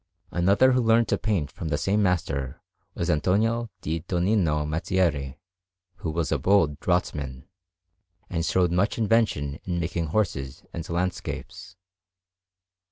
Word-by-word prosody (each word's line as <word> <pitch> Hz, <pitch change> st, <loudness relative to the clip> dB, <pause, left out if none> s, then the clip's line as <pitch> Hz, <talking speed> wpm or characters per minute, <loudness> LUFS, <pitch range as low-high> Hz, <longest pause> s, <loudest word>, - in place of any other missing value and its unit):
Another 100 Hz, +9 st, +4 dB
who 125 Hz, 0 st, +3 dB
learnt 115 Hz, 0 st, +4 dB
to -, -, +2 dB
paint 100 Hz, -10 st, -1 dB
from 85 Hz, -, -6 dB
the 75 Hz, -2 st, 0 dB
same 100 Hz, +6 st, +1 dB
master 80 Hz, -9 st, -1 dB, 0.4 s
was -, -, -2 dB
Antonio 110 Hz, +9 st, +1 dB
di 80 Hz, +2 st, -2 dB
Donnino 85 Hz, -3 st, +1 dB
Mazzieri, 75 Hz, -4 st, 0 dB, 0.6 s
who 80 Hz, -, -4 dB
was 80 Hz, 0 st, -1 dB
a -, -, +1 dB
bold 85 Hz, -7 st, +3 dB
draughtsman, 70 Hz, -8 st, -1 dB, 0.8 s
and 85 Hz, -, -2 dB
showed 90 Hz, 0 st, +2 dB
much 95 Hz, +5 st, +1 dB
invention 105 Hz, -11 st, +1 dB
in 90 Hz, -2 st, -2 dB
making 85 Hz, 0 st, -2 dB
horses 75 Hz, -8 st, -2 dB
and 85 Hz, -1 st, -6 dB
landscapes. 90 Hz, +2 st, -4 dB
85 Hz, 130 wpm, -26 LUFS, 75-100 Hz, 0.8 s, Another